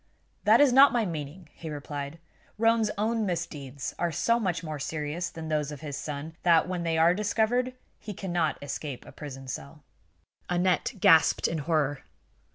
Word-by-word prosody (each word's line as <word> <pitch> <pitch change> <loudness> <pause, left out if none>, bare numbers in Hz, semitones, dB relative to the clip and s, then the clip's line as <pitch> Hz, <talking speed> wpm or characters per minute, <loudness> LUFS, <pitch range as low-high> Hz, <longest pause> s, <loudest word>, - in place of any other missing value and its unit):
"That 220 +2 +6
is 285 -3 +5
not 275 +2 +8
my 235 -3 +2
meaning," 160 0 -6
he 160 - -8
replied. 145 0 -6 0.4
"Roane's 225 0 +3
own 220 +2 0
misdeeds 145 -8 -4
are 175 -1 0
so 230 +9 +2
much 180 -6 -1
more 155 -2 -5
serious 155 +5 -3
than 160 -1 -8
those 150 -2 -1
of 145 - -8
his 145 -3 -5
son 150 +2 -6
that, 170 -1 +4
when 180 -1 -3
they 165 -1 0
are 165 +2 +5
discovered, 220 +5 0 0.2
he 210 - -7
cannot 175 -5 -1
escape 145 -2 -5
a - - -11
prison 135 -3 -9
cell." 140 +3 -7 0.7
Aneth 180 +5 +1
gasped 160 -2 +5
in 165 - -2
horror. 145 -2 0
165 Hz, 165 wpm, -28 LUFS, 150-205 Hz, 0.7 s, not